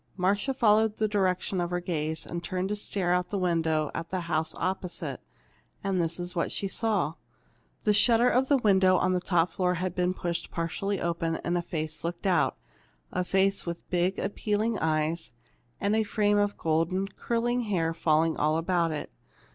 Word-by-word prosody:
Marcia 200 +8 +1
followed 220 -4 +3
the 220 - +1
direction 190 -2 0
of 175 - -1
her 175 0 -1
gaze, 160 -2 -3
and 170 +1 -5
turned 185 +2 -2
to 210 - 0
stare 195 -3 -1
out 180 0 +1
of - - -34
the 205 - -2
window 165 -4 +1
at 165 0 -5
the 185 -1 -2
house 160 -2 -1
opposite. 185 -1 -3 0.6
And 195 -2 +1
this 165 +1 0
is 175 0 -5
what 170 - 0
she 200 - -2
saw: 205 -6 0 0.7
The 210 - +3
shutter 230 +3 +5
of 255 +1 +2
a 285 - +5
window 190 -5 +4
on 185 0 +2
the 180 - 0
top 175 -1 +2
floor 180 0 0
had 180 0 -2
been 180 0 0
pushed 175 -2 -3
partly 185 +4 -2
open, 170 -1 -1
and 175 - 0
a 175 - +1
face 155 -2 -5
looked 170 +3 -4
out, 180 -5 +2 0.5
a 180 - 0
face 195 +1 +1
with 170 0 -5
big, 180 +1 +1
appealing 210 +2 -1
eyes, 160 -1 -1 0.5
and 205 +1 +1
a 220 - +3
frame 205 -1 +2
of 205 0 0
golden, 165 +4 0
curling 240 +3 -1
hair 165 -6 0
falling 160 0 +2
all 155 +1 +2
about 170 0 +1
it. 150 - -5
180 Hz, 185 wpm, -28 LUFS, 165-205 Hz, 0.7 s, shutter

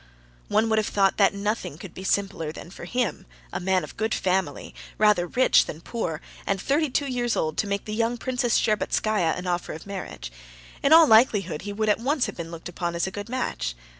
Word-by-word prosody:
One 225 - +2
would 220 -1 +3
have 215 - -1
thought 195 -1 +2
that 200 -1 +4
nothing 205 -6 -2
could 175 0 -10
be 190 - -8
simpler 190 -5 -1
than 170 - -10
for 180 - -9
him, 240 - -2 0.3
a - - -2
man 185 0 +1
of - - -10
good 220 +1 0
family, 185 -5 -1 0.2
rather 210 -5 +4
rich 255 +8 +4
than 155 - -6
poor, 170 -5 -4 0.3
and 195 -1 +1
thirty 290 - +1
two 285 +3 0
years 245 -3 -1
old, 155 -1 -1
to 205 - +1
make 200 0 -2
the 215 - -5
young 230 +2 0
Princess 250 -1 +1
Shtcherbatskaya 215 -4 +1
an 180 - -6
offer 175 -1 -2
of 155 - -9
marriage; 195 - -7 0.5
in 275 - +2
all 325 0 +9
likelihood 215 - +4
he 205 - -5
would 215 +1 -1
at 210 - +3
once 270 +3 +1
have 200 - -6
been 165 -1 -6
looked 165 -1 -8
upon 175 -1 -3
as 170 - 0
a 190 - -4
good 205 +3 -7
match. 250 - -2
200 Hz, 220 wpm, -25 LUFS, 175-230 Hz, 0.5 s, all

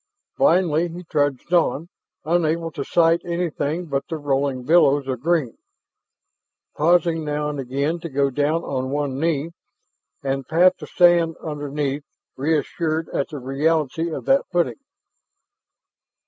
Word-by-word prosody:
Blindly 170 -1 +3
he 175 +2 -8
trudged 145 0 -1
on, 165 -2 +2 0.4
unable 165 0 0
to 145 -3 -4
sight 165 +3 +3
anything 170 -1 -2
but 140 -3 -2
the 165 - -3
rolling 140 -3 -1
billows 145 -2 +4
of 130 -3 -2
green, 155 -4 0 1.2
pausing 170 0 +2
now 150 0 -2
and 145 -1 -5
again 140 +6 -2
to 170 0 -6
go 140 0 +1
down 145 +5 0
on 130 -1 -3
one 140 -1 -2
knee 160 0 0 0.7
and 135 -1 -2
pat 180 +3 +4
the - - -8
sand 175 -2 +4
underfoot, 145 -2 -3 0.3
reassured 160 +2 -1
at 140 - -2
the 150 - -6
reality 150 +4 0
of - - -5
that 270 +1 +3
footing. 175 - 0
155 Hz, 135 wpm, -22 LUFS, 140-170 Hz, 1.2 s, billows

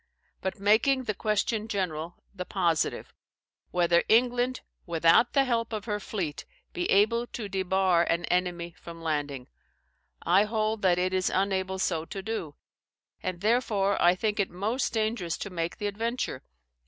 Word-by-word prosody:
But 190 - -3
making 225 +7 +3
the 215 - -2
question 215 +2 -1
general, 175 -5 -3 0.2
the 185 -2 -5
positive, 175 -4 -1 0.6
WHETHER 170 -1 +3
England, 245 +2 +3 0.3
WITHOUT 170 +7 +4
THE 275 - +4
HELP 235 -3 -1
OF 210 -2 -4
HER 210 -2 -2
FLEET, 185 -8 -4 0.3
BE 175 - -2
ABLE 230 +4 +3
TO 225 -4 -6
DEBAR 190 -2 +2
AN 170 +1 +1
ENEMY 175 -1 -1
FROM 165 -1 -10
LANDING; 145 -5 -2 0.8
I 190 +5 +4
hold 215 0 -1
that 180 -2 +3
it 185 +1 0
is 185 0 +1
unable 190 0 0
so 165 -4 -1
to 195 +2 -7
do; 210 -9 -4 0.7
and 185 -1 -4
therefore 210 -3 +1
I 175 +1 +5
think 210 +2 -1
it 200 - +1
most 215 +9 -1
dangerous 215 -6 -1
to 200 - -6
make 170 -1 -3
the 210 - -4
adventure. 225 - -2
195 Hz, 155 wpm, -28 LUFS, 175-220 Hz, 0.8 s, I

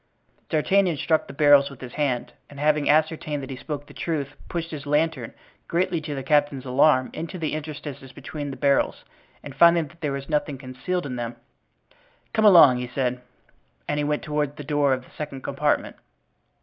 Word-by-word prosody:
D'Artagnan 175 +2 +2
struck 160 +2 +1
the - - -8
barrels 145 -1 +5
with 140 - -13
his 125 -1 -9
hand, 135 -5 -1 0.2
and 140 - -11
having 150 0 +2
ascertained 155 -1 +1
that 135 - -7
he - - -4
spoke 145 +2 -6
the - - -15
truth, 150 -5 -2 0.2
pushed 170 -1 -4
his 145 -2 -7
lantern, 150 -4 0 0.4
greatly 170 -1 0
to 150 -1 -5
the 135 - -4
captain's 145 -2 +1
alarm, 130 0 +3
into 165 +4 -6
the 160 -3 -2
interstices 150 -3 -7
between 145 +2 -6
the 135 - -7
barrels, 140 -1 +1 0.4
and 145 - -8
finding 170 +2 +5
that 170 +2 -21
there 150 -3 -1
was 140 0 -5
nothing 150 -2 -1
concealed 130 +7 -4
in 125 -3 -4
them: 120 0 -4 1.0
"Come 220 -1 +2
along," 165 -11 +8
he 125 - -4
said; 125 0 -2 0.7
and 145 - -1
he - - 0
went 150 0 -1
toward 150 -1 -2
the 150 - -6
door 145 -1 +1
of 130 -1 -3
the - - -20
second 140 -4 -6
compartment. - - -1
145 Hz, 190 wpm, -24 LUFS, 135-155 Hz, 1.0 s, along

